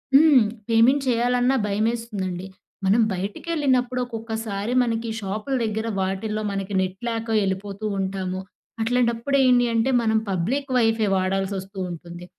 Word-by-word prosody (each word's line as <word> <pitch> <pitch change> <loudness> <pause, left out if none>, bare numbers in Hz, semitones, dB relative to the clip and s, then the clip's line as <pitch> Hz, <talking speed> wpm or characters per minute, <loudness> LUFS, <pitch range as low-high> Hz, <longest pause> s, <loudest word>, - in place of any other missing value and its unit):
హ్మ్. 285 -5 +7 0.3
పేమెంట్ 245 +5 +4
చేయాలన్నా 245 +2 +2
భయమేస్తుందండి. 205 -4 -2 0.4
మనం 210 +5 +4
బయటికెళ్ళినప్పుడు, 255 - -1
ఒక్కొక్కసారి 225 -2 -4
మనకి 230 -1 -2
షాపుల 210 +7 -3
దగ్గర 220 +1 -2
వాటిల్లో, 210 +3 -2
మనకి 195 0 -4
నెట్ 185 0 -3
లేక 230 0 -3
వెళ్ళిపోతూ 195 +2 -3
ఉంటాము. 190 -1 -2 0.4
అట్లాంటప్పుడు 245 +3 +1
ఏంటి 245 -1 +5
అంటే, 230 +4 +2
మనం 220 0 +2
పబ్లిక్ 260 +10 -1
వైఫై 225 -3 +2
వాడాల్సి 195 +1 -1
వస్తూ 195 +1 -11
ఉంటుంది. 175 +1 -9
220 Hz, 120 wpm, -23 LUFS, 195-245 Hz, 0.4 s, హ్మ్